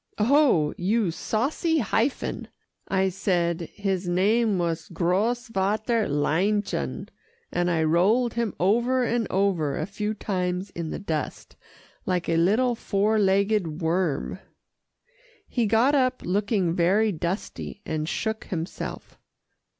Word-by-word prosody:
"Oh! 230 - +3
you 200 0 +1
saucy 280 - 0
hyphen," 240 +1 -1 0.4
I 190 0 +1
said 175 -3 -1
his 195 -3 -2
name 205 +4 +2
was 165 -2 -2
Grosvater 215 +4 0
Leinchen, 150 - 0 0.4
and 175 0 0
I 165 -2 +1
rolled 200 +10 +3
him 230 -4 -2
over 240 +7 +2
and 235 -1 0
over 180 -7 +1
a 155 - -1
few 210 +3 -3
times 185 -2 -2
in 170 -2 -5
the - - -4
dust, 160 -7 -4 0.5
like 180 -2 0
a 165 - +1
little 220 +9 +3
four 215 -1 +1
legged 195 -4 +1
worm. 165 -2 0 1.1
He 235 -3 0
got 230 +7 +3
up, 255 -2 +1
looking 195 -2 +1
very 195 +6 +3
dusty, 185 +3 -4
and 155 0 -2
shook 220 0 -2
himself. 170 0 -6
195 Hz, 120 wpm, -25 LUFS, 170-220 Hz, 1.1 s, Oh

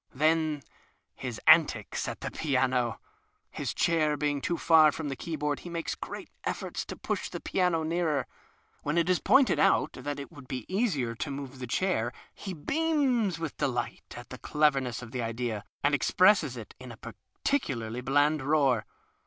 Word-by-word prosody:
Then 155 0 +2 0.5
his 125 -4 -6
antics 155 - +4
at - - -5
the - - -4
piano! 130 -4 0 0.5
His - - -3
chair 155 -3 +2
being 145 -1 0
too 170 - -1
far 160 -2 +6
from 150 0 -4
the 135 - -3
keyboard 150 -1 -2
he 175 - -9
makes 170 -1 -3
great - - -8
efforts - - -3
to - - -6
push - - -3
the - - -5
piano 180 -4 +1
nearer. 160 -3 0 0.6
When 150 +3 -1
it 170 +2 +3
is 180 - +2
pointed 265 +5 +4
out - - +3
that 145 -1 -5
it 140 -4 -8
would 135 -3 -13
be 125 -3 -5
easier 180 - 0
to 115 - -4
move 135 -1 -6
the 125 - -5
chair 120 -5 0 0.2
he 195 - -7
beams 255 - +1
with 165 -3 -5
delight 125 -5 -3
at - - -10
the - - -7
cleverness 135 -5 +1
of 120 - -10
the 125 - -3
idea 115 -2 -3 0.2
and 145 +1 +3
expresses 165 - +4
it 110 - -9
in 130 -1 -9
a 115 - -11
pecu 140 - -3
liarly 115 +2 -5
bland 145 +3 +3
roar. 135 -6 +2
145 Hz, 175 wpm, -29 LUFS, 125-165 Hz, 0.6 s, far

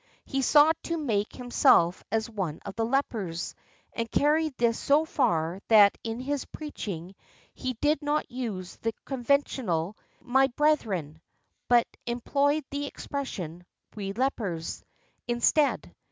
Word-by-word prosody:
He 270 -1 -1
sought 300 +4 +5
to 335 - -1
make 220 -9 -1
himself 185 -8 +3
as 220 0 0
one 190 -9 -4
of 200 - -5
the 225 +1 -1
lepers, 215 -10 -1 0.4
and 230 -1 -3
carried 300 +1 +2
this 235 -1 +2
so 295 +3 +3
far 180 - 0
that 210 -3 +7
in 225 +1 -4
his 280 +1 -2
preaching 195 - -6 0.4
he 255 -1 -3
did 295 +5 +1
not 295 +1 -1
use 215 -8 -5
the 225 0 -2
conventional 240 - 0 0.2
"My 265 +2 +3
brethren," 215 - 0 0.5
but 240 -1 +5 0.2
employed 280 +5 +1
the 285 0 -2
expression, 180 - -5 0.3
"We 195 -2 -4
lepers," 200 -9 -2 0.4
instead. 245 +5 +2
240 Hz, 125 wpm, -28 LUFS, 195-280 Hz, 0.5 s, that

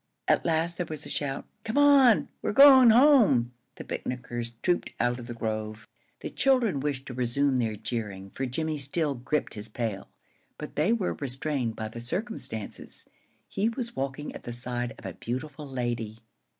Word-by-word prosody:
At - - +3
last 165 +1 0
there 180 - -2
was 155 -1 -6
a - - -8
shout. 140 -2 -3 0.2
"Come 220 +4 -3
on! 280 -5 +6
we're - - -1
going 265 -1 +9
home." 225 - +5 0.2
The - - -8
picnickers 120 -2 -5
trooped 180 -1 +1
out 120 +1 +1
of 120 - -9
the 120 - -6
grove. 110 -1 -4 0.3
The - - -5
children 255 - +2
wished 135 -1 -2
to 130 - -7
resume 130 +2 +1
their 115 -3 0
jeering, 105 -3 -5
for 135 - -3
Jimmie 155 +4 -2
still 145 +2 0
gripped 135 +4 -2
his 105 0 -5
pail, 110 -3 -4 0.5
but - - -8
they 155 +8 +2
were 230 -6 0
restrained 135 -3 -2
by 110 - -4
the 115 +2 -8
circumstances. 130 - -5 0.4
He 210 +3 0
was 235 -1 -5
walking 135 +2 -4
at - - -9
the 120 - -6
side 120 0 -3
of - - -14
the - - -5
beautiful 140 +4 -5
lady. 120 -4 -3
135 Hz, 175 wpm, -27 LUFS, 120-175 Hz, 0.5 s, going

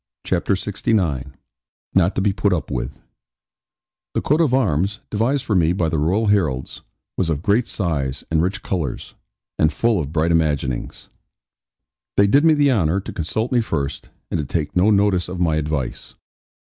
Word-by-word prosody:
CHAPTER 90 +2 +1
LXIX 95 - 0 0.7
NOT 95 0 +3
TO - - 0
BE 100 0 +2
PUT 100 -1 +1
UP 80 - -3
WITH 65 +1 -4 1.1
The - - +1
coat 150 +4 +2
of 155 -6 +2
arms, 100 - +1
devised 120 +6 0
for 110 - 0
me 85 -1 +3
by 85 -3 0
the 80 -1 -1
Royal 95 +9 +1
heralds, 80 -11 0 0.4
was 90 - 0
of 80 -1 -2
great 105 +5 +2
size, 70 -9 -2
and 80 -1 +3
rich 100 +5 -2
colours, 80 -10 -3 0.5
and 80 - +4
full 115 -1 +1
of 75 -3 -4
bright 80 +1 +1
imaginings. 75 -6 -1 1.1
They 100 - +6
did 140 +9 +4
me 160 -1 +5
the 145 -2 +3
honour 95 -6 +2
to 100 - -8
consult 110 - -2
me 125 -2 +3
first, 70 -10 -3 0.2
and - - 0
to - - -1
take 75 +2 -3
no 90 +4 +4
notice 100 -4 +2
of 90 0 -5
my 80 -3 +2
advice. 75 -4 -3
90 Hz, 175 wpm, -21 LUFS, 75-105 Hz, 1.1 s, They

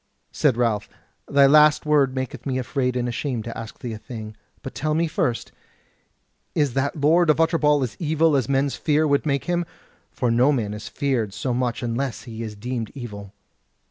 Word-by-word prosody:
Said 135 -6 +2
Ralph: 115 -4 0 0.4
"Thy 140 0 +5
last 150 +2 +5
word 145 -3 +3
maketh 130 +2 -4
me 130 -1 -1
afraid 125 0 -1
and 125 -1 -1
ashamed 120 -1 -3
to 115 - -6
ask 115 -1 -8
thee 120 -4 -5
a 110 - -7
thing. 110 -2 -8 0.3
But 135 - -6
tell 155 0 -1
me 165 +1 +2
first, 155 - -1 1.0
is 145 -5 +1
that 140 +3 -1
Lord 165 +4 +4
of 155 - +4
Utterbol 150 -3 +3
as 125 - -5
evil 160 -1 +2
as 130 -3 0
men's 140 0 +1
fear 155 0 +1
would 140 +1 +1
make 140 -1 0
him? 175 0 0 0.5
for 125 -2 -1
no 125 +5 +4
man 110 -7 -1
is 105 0 -7
feared 120 -8 -1
so 125 +3 -2
much 125 0 -1
unless 120 +2 -2
he 115 -2 -8
is 110 -2 -5
deemed 115 +1 -4
evil." 105 -6 -8
130 Hz, 190 wpm, -23 LUFS, 115-150 Hz, 1.0 s, Thy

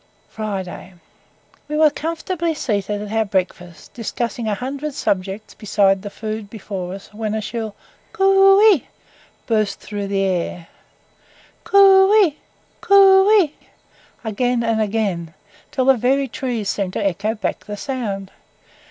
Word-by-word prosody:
FRIDAY. 190 -3 -6 0.7
We 300 0 -3
were 310 -1 +5
comfortably 330 +2 -3
seated 205 -5 -2
at 210 - -8
our 220 0 +2
breakfast, 180 -4 -4
discussing 230 0 -4
a 210 - 0
hundred 275 +5 -5
subjects 195 +2 -2
besides 195 -2 +1
the 205 - -6
food 215 0 -6
before 190 -4 -6
us, 195 +2 -13
when 215 0 -3
a - - -1
shrill 220 -1 -5 0.4
"coo 390 -1 +5
ey" 295 - -3 0.6
burst 215 -3 0
through 205 -1 -5
the 195 0 0
air; 175 -2 -2 0.9
"coo 390 -1 +6
ey" 305 -3 -4 0.5
"coo 390 0 +6
ey" 305 -5 -2 0.7
again 240 +2 0
and 225 -1 +1
again, 195 -7 -2 0.3
till 260 - -1
the 270 -1 +5
very 270 +4 +1
trees 245 -5 -4
seemed 195 -2 -2
to 205 - -2
echo 200 +4 -1
back 215 - -4
the 205 0 -6
sound. 205 -8 -4
220 Hz, 135 wpm, -20 LUFS, 200-275 Hz, 0.9 s, coo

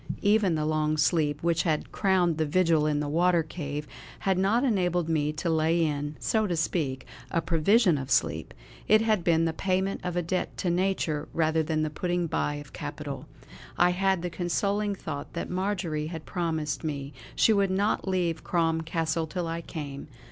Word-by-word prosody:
Even 205 -4 +3
the 155 -1 -1
long 155 0 +1
sleep 150 -1 +1
which 170 -1 +2
had 155 -3 -1
crowned 180 -4 +2
the 155 - +2
vigil 165 -2 +3
in 150 -1 +1
the 150 - -2
water 170 +2 +3
cave 150 -2 -5 0.4
had 190 -1 +2
not 200 +7 +2
enabled 180 - +1
me 150 -2 +1
to 155 +3 -4
lay 165 +1 +2
in, 145 0 -2
so 215 - +1
to 175 -3 -1
speak, 145 -5 -1 0.2
a 165 - +1
provision 170 - +3
of 135 0 -6
sleep; - - +1 0.4
it 215 +1 +6
had 215 -5 +2
been 165 -1 +3
the 165 - 0
payment 190 +3 -1
of 180 -1 -3
a 175 - 0
debt 180 +3 -2
to 175 - 0
nature 175 -4 0
rather 160 0 +2
than 155 0 0
the 155 - -2
putting 175 +2 -1
by 150 -2 -1
of 145 -1 -9
capital. - - -6 0.5
I 175 0 +5
had 190 -1 +1
the 175 - -3
consoling 200 +4 0
thought 140 -6 -6
that 170 - -4
Marjory 180 -5 -1
had 160 -1 -7
promised 160 -4 -2
me 145 -2 -4 0.2
she 220 - +5
would 200 -2 +2
not 195 +2 0
leave 175 -4 0
Crom 165 -2 +1
Castle 160 0 -1
till 175 +2 -3
I 165 +1 -3
came. 145 -4 -7
165 Hz, 185 wpm, -27 LUFS, 155-185 Hz, 0.5 s, it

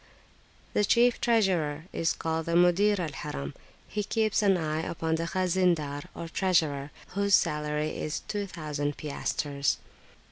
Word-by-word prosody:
The 210 - +3
chief 240 +3 +4
treasurer 180 -10 +2
is 165 - +1
called 160 0 -2
the 170 - 0
Mudir 180 +4 +4
al 165 -4 -2
Harim; 70 - -5 0.3
he 210 - -2
keeps 215 +1 +1
an 195 -3 +4
eye 155 -1 -1
upon 160 -1 -2
the 165 +1 0
Khaznadar, 175 -6 +1
or 165 - -5
treasurer, 160 -6 +1 0.2
whose 200 0 +3
salary 150 -1 0
is 155 - -3
2000 155 -8 -3
piastres. 145 -1 -1
165 Hz, 135 wpm, -28 LUFS, 150-195 Hz, 0.3 s, chief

